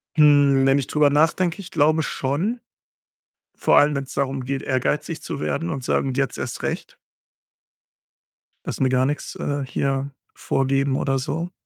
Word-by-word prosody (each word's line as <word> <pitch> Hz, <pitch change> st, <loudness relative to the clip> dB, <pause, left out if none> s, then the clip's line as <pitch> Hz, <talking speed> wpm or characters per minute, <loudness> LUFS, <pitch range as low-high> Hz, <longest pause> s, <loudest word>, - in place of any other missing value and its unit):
Hm, 145 Hz, -3 st, +5 dB
wenn 135 Hz, +1 st, +4 dB
ich 140 Hz, -, -2 dB
drüber 150 Hz, -1 st, +3 dB
nachdenke, 165 Hz, +5 st, +1 dB
ich 180 Hz, -, -11 dB
glaube 155 Hz, +2 st, +3 dB
schon. 160 Hz, -, -2 dB, 1.0 s
Vor -, -, +3 dB
allem, 145 Hz, 0 st, +5 dB
wenn's 135 Hz, -1 st, -4 dB
darum 135 Hz, -1 st, -1 dB
geht, 135 Hz, +1 st, -3 dB
ehrgeizig 145 Hz, +4 st, -1 dB
zu -, -, -5 dB
werden 75 Hz, +3 st, -2 dB
und 130 Hz, -, -4 dB
sagen: 135 Hz, +1 st, 0 dB
„Jetzt 135 Hz, -1 st, -1 dB
erst 125 Hz, -, -5 dB
recht.“ -, -, -4 dB, 1.7 s
„Lasse -, -, -2 dB
mir 130 Hz, -, +3 dB
gar 130 Hz, 0 st, +2 dB
nix, 145 Hz, +2 st, -3 dB
äh, 145 Hz, -1 st, -2 dB
hier 135 Hz, +1 st, -2 dB, 0.2 s
vorgeben“ 135 Hz, 0 st, 0 dB
oder 135 Hz, -1 st, 0 dB
so. 165 Hz, +6 st, -3 dB
140 Hz, 155 wpm, -22 LUFS, 135-150 Hz, 1.7 s, Hm